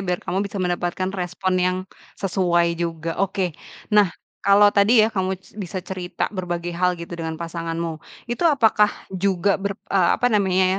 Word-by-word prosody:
biar 180 -2 -2
kamu 190 - -1
bisa 200 0 -4
mendapatkan 180 +1 -1
respon 185 0 -2
yang 180 0 +2 0.4
sesuai 175 -3 +1
juga. 165 -1 -2
Oke. 190 -2 0 0.4
Nah, 210 -2 +6 0.3
kalau 205 +1 +6
tadi 215 +2 +5
ya, 220 - -1
kamu 190 -1 -1
s 190 - -22
bisa 190 -3 -6
cerita 185 +1 -4
berbagai 175 -2 -3
hal 180 +1 +1
gitu 170 0 -9
dengan 165 -1 -4
pasanganmu. 165 -1 -4 0.2
Itu 240 +8 +1
apakah 220 -7 +4 0.2
juga 195 +1 +1
ber 200 0 -2 0.2
eee, 185 -3 +4
apa 245 -1 +1
namanya 190 -3 +3
185 Hz, 160 wpm, -22 LUFS, 175-200 Hz, 0.4 s, Nah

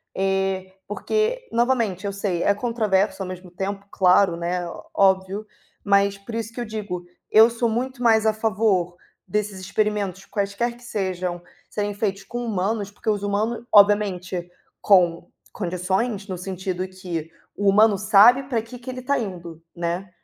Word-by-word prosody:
Eh, 190 -1 -1
porque, 440 - -1
novamente 230 -6 +1
eu 200 - -2
sei 195 -3 -1
é 200 - +4
controverso 210 -4 0
ao - - -6
mesmo 185 -1 -9
tempo 195 +2 -4
claro, 180 -1 +4
né, 175 +1 -2 0.3
óbvio, 195 +2 +2 0.4
mas 200 0 +3
por 200 +4 -10
isso 225 -1 -3
que 240 - -5
eu - - -3
digo, 205 -5 -5 0.3
eu 220 +2 +8
sou 235 0 0
muito 250 +3 -3
mais 220 -2 +4
a 220 - +4
favor 205 -5 +1 0.3
desses 210 -2 -2
experimentos 200 -1 -1
quaisquer 205 +4 -2
que 245 - -18
sejam, 185 -5 -3 0.3
serem 205 -1 -2
feitos 200 -2 -2
com 240 +4 -5
humanos, 205 0 -1
porque 210 - -4
os 205 -2 +1
humanos 215 +3 -1
obviamente, 195 -4 +3 0.3
com 175 -4 +3 0.2
condições 190 +4 -2
no 185 -2 -4
sentido 185 0 -4
que, 180 -4 -6 0.3
o 205 - -1
humano 210 0 +5
sabe 215 +6 +6
para 245 -4 -1
que 230 +3 -10
que 245 - -9
ele 255 - -6
está 280 +3 0
indo, 170 -6 -6
né, 175 +2 -3
200 Hz, 155 wpm, -23 LUFS, 185-220 Hz, 0.4 s, eu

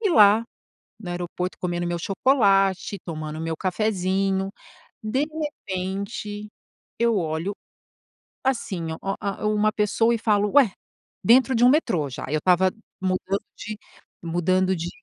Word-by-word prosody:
e 415 -5 +1
lá 215 -3 +6 0.6
no 180 -5 -6
aeroporto 180 +1 -4
comendo 175 -1 -2
meu 175 0 -1
chocolate 195 -2 +2
tomando 155 -2 -5
meu 165 -1 -2
cafezinho, 195 0 0 0.5
de 260 +7 0
repente 205 -7 -4 0.5
eu 235 -2 +3
olho, 165 +3 -2 0.9
assim 190 -11 -1
o - - -6 0.2
a 200 +1 -3
uma 215 0 +2
pessoa 225 +2 +2
e - - -1
falo: 210 -2 +2
"Ué!". 255 -9 +6 0.5
Dentro 255 +4 +5
de 235 +1 +4
um - - +8
metrô 185 - +1
já, - - -6
eu 155 +2 +1
estava 185 +3 +3 0.3
mudando 190 +1 -1 0.2
de 215 0 -6 0.4
mudando 185 +2 +1
de 170 +1 -3
195 Hz, 130 wpm, -24 LUFS, 180-215 Hz, 0.9 s, um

